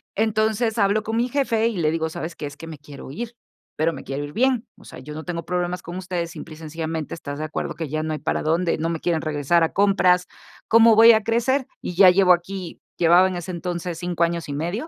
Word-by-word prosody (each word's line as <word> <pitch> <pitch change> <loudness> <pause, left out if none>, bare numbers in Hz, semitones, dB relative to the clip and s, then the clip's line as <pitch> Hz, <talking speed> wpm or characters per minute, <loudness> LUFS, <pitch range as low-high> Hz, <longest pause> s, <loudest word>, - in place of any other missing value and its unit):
Entonces, 220 +1 +1
hablo 205 0 +2
con 225 +1 -3
mi 240 +1 +1
jefe 235 -4 +1
y 230 -4 -3
le 155 -3 +1
digo: 160 0 -1
"¿Sabes 160 +1 -6
qué? - - -6
Es 145 0 -8
que 165 - -9
me 160 -2 -8
quiero 145 -2 -11
ir, 235 +10 -6 0.4
pero 160 +2 +1
me 135 - -8
quiero 135 +2 -4
ir 145 0 -8
bien. 255 -1 +1
O - - -18
sea, - - -11
yo 150 +4 -9
no 155 +1 -7
tengo 170 -1 -4
problemas 180 0 -2
con 175 +1 -7
ustedes, 180 -2 -4
simple 155 -1 -9
y - - -16
sencillamente, 160 0 -5
¿estás 145 -3 -6
de 155 - -2
acuerdo 155 - -4
que 160 -2 -4
ya 155 +2 -2
no 155 0 -2
hay 155 - -4
para - - -1
dónde? 165 +2 +1
No 160 +1 -2
me 165 -1 -2
quieren 170 -2 0
regresar 155 +2 +1
a 165 - 0
compras, 185 -3 +3 0.4
¿cómo 230 0 +6
voy 225 +2 +9
a 220 -1 +2
crecer? 245 +4 +1
Y - - -5
ya 190 +1 +8
llevo 180 0 +5
aquí" 180 0 -5 0.2
llevaba 175 +2 +5
en 185 - -4
ese 175 +1 -5
entonces 175 -1 -4
5 175 -1 -1
años 170 0 -1
y 145 - -4
medio. 175 - -3
175 Hz, 250 wpm, -23 LUFS, 160-205 Hz, 0.4 s, voy